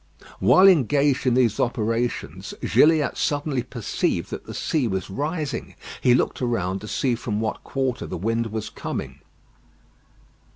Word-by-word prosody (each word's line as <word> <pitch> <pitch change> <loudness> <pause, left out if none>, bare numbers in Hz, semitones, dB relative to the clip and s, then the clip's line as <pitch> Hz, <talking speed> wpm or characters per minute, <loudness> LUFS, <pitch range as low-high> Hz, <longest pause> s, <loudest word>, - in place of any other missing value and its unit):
While 190 +1 +6
engaged 145 - +3
in 125 - +3
these 120 -4 +2
operations, 120 0 -2
Gilliatt 155 -1 +3
suddenly 145 -3 0
perceived 115 -3 -2
that - - -6
the - - -6
sea 145 -7 0
was 95 -2 -3
rising. 145 - -3 0.3
He 125 -1 +5
looked - - 0
around 100 -6 -1
to 105 - -8
see 125 +3 0
from 110 -3 -3
what 110 -1 -3
quarter 130 -2 -2
the - - -5
wind 115 +5 -1
was 110 0 -4
coming. - - -5
125 Hz, 140 wpm, -24 LUFS, 110-145 Hz, 0.3 s, While